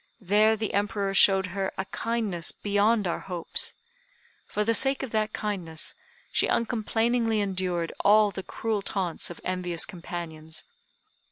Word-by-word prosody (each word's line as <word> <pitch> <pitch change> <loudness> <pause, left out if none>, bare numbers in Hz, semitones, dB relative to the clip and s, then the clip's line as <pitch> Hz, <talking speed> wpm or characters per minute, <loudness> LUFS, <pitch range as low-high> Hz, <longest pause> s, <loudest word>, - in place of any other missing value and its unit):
There 210 +3 +4
the 220 -1 -3
Emperor 200 -1 0
showed 195 -1 +5
her 195 -1 -1
a 190 - -2
kindness 215 -7 -2
beyond 205 +1 +2
our 170 - -1
hopes. 180 -3 -1 0.7
For 210 - 0
the 230 +2 +2
sake 270 +3 +3
of 260 - -5
that 215 -1 0
kindness 180 -8 -3 0.4
she - - +2
uncomplainingly 230 0 +1
endured 185 -4 -1
all 210 0 +5
the 195 - -5
cruel 215 +3 -2
taunts 190 -4 -2
of 175 - -8
envious 180 -2 0
companions. 170 -4 -6
200 Hz, 140 wpm, -27 LUFS, 180-220 Hz, 0.7 s, showed